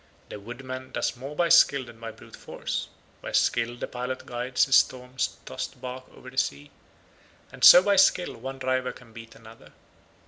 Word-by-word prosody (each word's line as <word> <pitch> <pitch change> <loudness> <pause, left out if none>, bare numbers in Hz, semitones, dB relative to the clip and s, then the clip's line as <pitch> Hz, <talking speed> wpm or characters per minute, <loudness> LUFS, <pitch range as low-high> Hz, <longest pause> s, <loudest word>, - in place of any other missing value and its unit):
The - - -8
woodman 130 +4 -8
does - - -2
more 135 +4 -8
by 170 +1 +1
skill 140 -4 +5
than 120 -1 -14
by 115 0 -7
brute 110 - -14
force; - - -5 0.3
by - - -7
skill 120 +1 +1
the - - -4
pilot 125 +1 -5
guides 125 +1 0
his 135 - +5
storm 125 0 -1 0.3
tossed - - -6
barque 130 0 -8
over 125 - -14
the 130 - -1
sea, 70 +1 -3 0.8
and - - -11
so 180 - +10
by 200 0 +2
skill 180 -1 +3
one 135 +3 -7
driver 130 -1 -1
can 115 -2 -17
beat 115 0 -12
another. 115 0 -16
125 Hz, 180 wpm, -26 LUFS, 120-130 Hz, 0.8 s, so